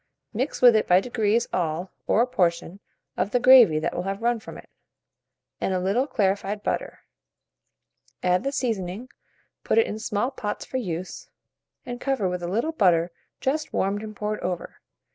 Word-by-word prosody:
Mix 255 +4 -3
with 240 -2 +8
it 215 - +2
by 180 +1 +6
degrees 225 +1 0
all, 175 +1 -2 0.2
or 230 - +4
a - - +1
portion, 180 -5 -1 0.4
of - - 0
the 245 - +1
gravy 245 -10 +7
that 155 - -1
will - - -1
have 195 +3 -4
run 240 -1 +1
from - - -10
it, - - -13 0.9
and 190 - -1
a - - +1
little 200 +9 +1
clarified 205 -2 -1
butter; - - -3 1.2
add 180 +1 +2
the 275 - -1
seasoning, 225 -3 -3 0.5
put - - 0
it 455 - +6
in 215 - -5
small 215 +4 -1
pots 210 -6 -5
for 260 - -4
use, 185 -6 -5 0.6
and 245 0 -6
cover 265 -8 0
with 180 0 -3
a 175 - -3
little 230 - -1
butter 175 - +2 0.3
just 300 +4 -2
warmed 200 +2 0
and 215 -1 -8
poured 210 +1 -3
over. 180 -1 -5
210 Hz, 175 wpm, -25 LUFS, 180-245 Hz, 1.2 s, with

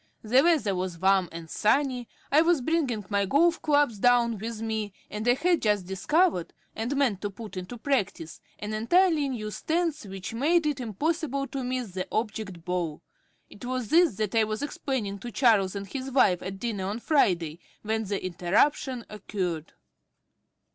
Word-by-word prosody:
The 245 +5 +5
weather 300 - +3
was 180 -2 -3
warm 190 0 +3
and 165 0 -8
sunny, 250 - +1 0.2
I 295 +3 +6
was 330 -3 +3
bringing 255 - 0
my 200 -1 +1
golf 330 - +3
clubs 290 -8 +2
down 235 -2 +3
with 225 +1 -5
me, 220 -2 -3 0.2
and 210 +2 -4
I 245 - +5
had 345 +4 +2
just 205 -4 +1
discovered 195 - +1 0.2
(and 230 +6 -2
meant 250 -9 +1
to 205 - -2
put 210 +1 -9
into 185 +6 -6
practice) 195 - -2 0.2
an 210 +1 -5
entirely 305 +6 +3
new 215 -5 -4
stance 320 -2 -1
which 190 +2 -6
made 310 +8 +2
it 295 -3 0
impossible 275 - -1
to 270 -2 -4
miss 250 -4 -3
the 185 0 -4
object 215 -6 -3
ball. 175 -4 -2 0.4
It 205 - -14
was 250 -3 -3
this 335 - +4
that 215 -1 -2
I 225 -1 +4
was 215 +3 -3
explaining 245 -8 -3
to 240 +4 -7
Charles 210 -7 +3
and 200 0 -4
his 260 +6 -5
wife 195 -9 +3
at 195 +1 -5
dinner 205 -3 -3
on 205 +3 -2
Friday, 175 - +1 0.2
when 220 +1 -1
the 200 -1 -3
interruption 215 - +1
occurred. 185 -6 -4
220 Hz, 170 wpm, -27 LUFS, 195-275 Hz, 0.4 s, I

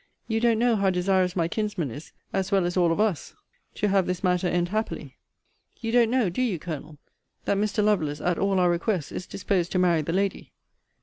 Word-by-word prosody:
You 225 -1 0
don't 230 -1 +3
know 235 0 +3
how 195 -1 +2
desirous 185 0 +1
my 170 -3 +1
kinsman 200 - -2
is, 145 +8 -9 0.2
as 195 0 -1
well 195 -3 +3
as 175 - -2
all 175 -2 +3
of 165 - -1
us, 210 - 0 0.4
to 210 - 0
have 195 -2 +2
this 180 0 -3
matter 180 -1 +2
end 175 0 0
happily. 215 +3 -4 0.6
You 225 -1 -3
don't 235 -1 +4
know, 250 -3 +2
do 180 +8 -2
you, 230 -8 0
Colonel, 155 -1 -7 0.5
that 200 - +1
Mr. 210 +1 0
Lovelace, 160 -9 +1
at 175 -2 0
all 195 -1 +2
our 180 -1 +4
requests, 175 -2 -1
is 185 - -6
disposed 185 -2 -1
to - - +1
marry 175 -3 +3
the 155 - -3
lady? 195 +2 -2
185 Hz, 210 wpm, -26 LUFS, 175-210 Hz, 0.6 s, don't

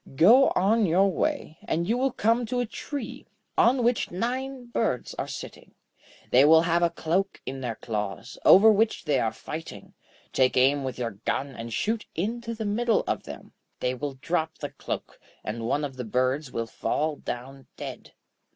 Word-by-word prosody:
Go 235 - +7
on 210 +3 +3
your 190 +4 +4
way, 290 - -2
and 170 +2 -1
you 225 - +2
will 265 +2 +1
come 230 +1 +1
to 250 +2 -1
a 245 - +1
tree, 255 +1 -6 0.3
on 245 +1 +4
which 240 0 +1
nine 255 +6 -3
birds 230 - -1
are - - -2
sitting. - - -9 0.6
They 130 +2 +7
will 160 +2 +7
have 170 0 +2
a 170 - +4
cloak 170 +4 -1
in 135 0 -5
their 120 -3 -3
claws, 105 +2 -5
over 215 +4 +8
which 215 -1 +1
they 145 -4 +2
are 115 -2 +1
fighting. 155 +8 -8 0.4
Take 130 -1 +3
aim 135 +2 +4
with 130 -1 -4
your 120 -2 -2
gun, 140 - -1
and 115 0 -7
shoot 220 - -1
into 230 +6 -3
the 220 -1 -4
middle 225 +2 +1
of - - -1
them. - - -10 0.3
They 125 0 0
will 140 +1 -4
drop 160 +4 -2
the - - -5
cloak, - - -6 0.2
and 115 +2 -4
one 145 +4 0
of 135 -2 -8
the 125 - -3
birds 130 +4 0
will 115 - -2
fall 150 +6 -2
down 135 +2 -7
dead. - - -8
165 Hz, 180 wpm, -26 LUFS, -, 0.6 s, over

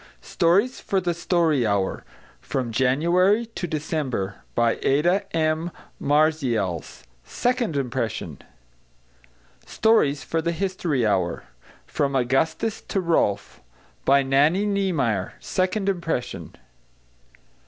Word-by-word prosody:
=Stories 195 +9 +2
for 195 - 0
the 175 -2 -1
Story 165 -5 +1
Hour= 100 -3 0 0.4
From 125 -3 -3
January 170 - +2
to 225 -5 -6
December. 145 - -3 0.2
By 120 -1 +2
ADA 175 +8 +2 0.2
M. 160 +1 0 0.3
MARZIALS. 135 - 0 0.2
Second 240 - -1
Impression. 115 - -3 1.2
=Stories 185 -11 +2
for 165 - -1
the 170 +1 -1
History 170 - -1
Hour= 95 -5 0 0.4
From 140 -1 -1
Augustus 135 - 0
to 195 - -1
Rolf. 160 - 0 0.4
By 140 0 +4
NANNIE 145 +9 +3
NIEMEYER. 160 - 0
Second 190 +2 -1
Impression. 170 -9 -3
155 Hz, 100 wpm, -24 LUFS, 125-185 Hz, 1.2 s, By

